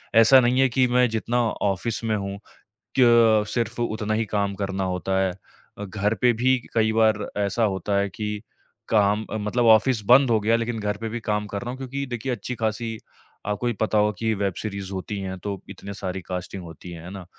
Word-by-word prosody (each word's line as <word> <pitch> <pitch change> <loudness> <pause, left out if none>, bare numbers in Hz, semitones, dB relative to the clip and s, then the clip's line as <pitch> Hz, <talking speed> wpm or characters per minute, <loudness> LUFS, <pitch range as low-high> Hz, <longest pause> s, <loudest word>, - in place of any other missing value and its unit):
ऐसा 115 +4 +8
नहीं 125 +2 +2
है 135 - +4
कि 125 +1 +2
मैं 125 0 +3
जितना 115 +2 -1 0.3
ऑफ़िस 115 +5 -3
में 110 -1 +1
हूँ 100 0 -4 0.6
कि - - +6
अ, 115 -3 +5
सिर्फ़ 120 +1 -2
उतना 110 -2 -1
ही 110 +1 +1
काम 100 -1 -1
करना 95 -1 -2
होता 95 +1 -1
है। 95 -1 +1 0.5
घर 100 +2 -1
पे 125 -1 +5
भी 130 +3 +2 0.2
कई 110 -1 +3
बार 110 -2 +2
ऐसा 100 +3 +1
होता 100 0 -1
है 100 0 +1
कि 105 +1 -4 0.5
काम 105 0 +2
मतलब 110 +3 0
ऑफ़िस 110 +1 +3
बंद 130 +1 +6
हो 115 - +4
गया 110 +2 +2
लेकिन 115 0 -2
घर 105 0 -1
पे 115 - -2
भी 120 +2 -4
काम 105 -1 -1
कर 100 -1 -4
रहा 120 - -4
हूँ 130 - -7
क्योंकि 135 +1 -4
देखिए 120 +2 -3
अच्छी 120 +2 -4
खासी 110 +1 -1 0.5
आपको 105 +4 -2
भी 120 - +2
पता 110 -1 +2
होगा 105 0 +3
कि 110 -1 0
वेब 100 -2 -1
सीरीज़ 100 -2 -5
होती 95 +2 -4
है 95 -1 -4
तो 100 - -2 0.2
इतनी 100 +1 -8
सारी 95 -1 -4
कास्टिंग 90 +1 -5
होती 85 +2 -10
है, 85 -1 -9
है 90 - -8
ना? 95 -1 -8
110 Hz, 215 wpm, -24 LUFS, 100-115 Hz, 0.6 s, ऐसा